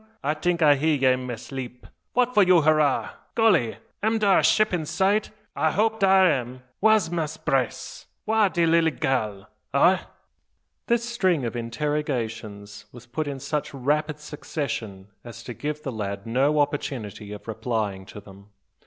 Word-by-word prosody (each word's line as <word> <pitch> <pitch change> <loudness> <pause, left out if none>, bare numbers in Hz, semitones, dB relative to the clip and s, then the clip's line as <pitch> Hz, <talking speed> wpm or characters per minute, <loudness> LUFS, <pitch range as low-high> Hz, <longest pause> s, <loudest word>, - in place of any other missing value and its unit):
I 150 - +1
tink 170 +2 0
I 145 -2 +6
hear 155 +2 +2
ye 130 -2 +3
in 130 0 -4
ma 120 - -3 0.2
'leep. 125 -2 -7 0.3
What 250 0 +2
for 210 - +5
you 180 -3 +5
hurrah? 155 -2 +2 0.2
Golly! 190 - +3 0.2
am 220 +2 +1
dar 200 -3 +4
a - - 0
ship 215 -2 +3
in 170 -3 0
sight? 200 +5 +1 0.3
I 160 - +2
hope 220 +6 +1
dar 190 -1 +5
am 130 -4 -2 0.2
Wha's 215 -4 +4
Mass' 160 -2 -2
Brace? 130 -6 -2 0.2
wha's 215 -3 +3
de 170 -1 +2
lilly 165 0 +4
gal? 110 -8 -2 0.3
Augh?" - - +4 0.8
This 235 0 +1
string 185 - +1
of 115 - -4
interrogations 115 -5 -4
was 120 -1 -13
put 145 +6 -4
in 140 -1 -4
such 150 +1 -3
rapid 150 +3 -1
succession 120 -10 -5
as 120 -1 -10
to 120 - -7
give 150 +4 -5
the 135 - -3
lad 100 -3 -5
no 135 +6 +1
opportunity 120 -8 -4
of 105 +1 -9
replying 110 -4 -3
to - - -10
them. 100 0 -15
145 Hz, 165 wpm, -25 LUFS, 120-170 Hz, 0.8 s, I